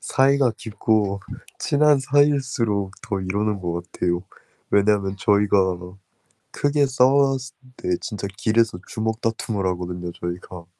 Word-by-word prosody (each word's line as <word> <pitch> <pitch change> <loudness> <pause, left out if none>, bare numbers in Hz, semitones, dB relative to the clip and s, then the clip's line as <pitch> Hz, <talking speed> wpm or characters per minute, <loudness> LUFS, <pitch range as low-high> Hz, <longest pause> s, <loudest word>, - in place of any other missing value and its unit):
사이가 135 -1 +3
깊고 110 -2 0 0.4
친한 145 -1 +3
사이일수록 130 -8 +1
더 105 -4 -3
이러는 100 +2 -1
것 85 -1 -3
같아요. 85 0 -1 0.5
왜냐하면 100 -1 +2
저희가 100 -3 +3 0.7
크게 145 0 +2
싸웠을 135 +1 +2 0.2
때 90 -1 -1
진짜 100 -1 -4
길에서 110 -3 +1
주먹다툼을 110 -2 -2
하거든요, 90 -1 -3
저희가. 85 0 -7
105 Hz, 280 characters per minute, -23 LUFS, 95-130 Hz, 0.7 s, 사이가